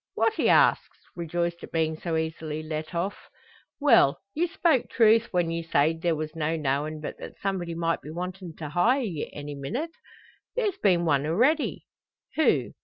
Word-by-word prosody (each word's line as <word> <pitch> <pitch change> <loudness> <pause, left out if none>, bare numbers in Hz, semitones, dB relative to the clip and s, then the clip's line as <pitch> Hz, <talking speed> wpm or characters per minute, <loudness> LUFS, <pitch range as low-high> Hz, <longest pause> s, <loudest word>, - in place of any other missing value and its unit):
"What?" 445 - +2
he - - +1
asks, - - +4 0.2
rejoiced 170 0 -2
at - - -9
being 160 -1 0
so 160 0 -2
easily 160 -1 -3
let 155 +2 -5
off. 185 +4 -3 0.5
"Well; 230 - +5
you 340 +4 +1
spoke 335 -7 +1
truth 225 0 +4
when 175 -2 0
ye 165 0 -2
sayed 160 0 +1
there 170 -2 +1
was 155 +1 -5
no 160 0 0
knowin' 150 +1 -1
but 150 - -6
that - - -9
somebody 180 -4 -2
might 165 0 0
be - - -10
wantin' 180 +1 -6
to 155 -2 -6
hire 225 - +3
ye 170 -10 -4
any 145 0 -7
minnit. 230 - -4 0.6
There's 420 -6 0
been 175 -4 +3
one 145 -3 +2
arready." 255 - +1 0.5
"Who? 315 - +2
170 Hz, 175 wpm, -27 LUFS, 155-210 Hz, 0.6 s, Well